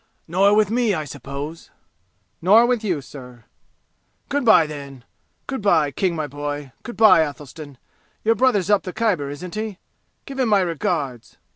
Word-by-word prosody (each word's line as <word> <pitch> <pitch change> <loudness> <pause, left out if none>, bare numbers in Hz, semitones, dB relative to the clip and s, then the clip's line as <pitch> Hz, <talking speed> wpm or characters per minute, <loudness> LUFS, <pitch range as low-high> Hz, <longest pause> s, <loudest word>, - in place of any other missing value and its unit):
"Nor 195 +5 +3
with 210 -1 +3
me, 230 -4 +1
I 155 -2 -3
suppose!" 145 +3 -8 0.7
"Nor 210 +7 +6
with 240 -2 0
you, 180 -8 -1
sir. 125 -3 -12 0.9
"Good 285 -1 0
by, 220 -8 +6
then. 140 -4 -9 0.4
Good 265 -3 -4
by, 160 -8 +3
King, 175 +5 -1
my 155 -2 -2
boy. 145 -1 -5
Good 240 -3 -9
by, 220 -5 +7
Athelstan. 145 -1 -6 0.5
Your 225 - +4
brother's 210 -5 +2
up 205 - +4
the 185 - -7
Khyber, 185 -11 0
isn't 170 +5 -8
he? 215 -2 -4 0.5
Give 270 -1 -8
him 250 -3 +2
my 205 -2 +4
regards. 150 -7 -3
175 Hz, 160 wpm, -21 LUFS, 145-215 Hz, 0.9 s, by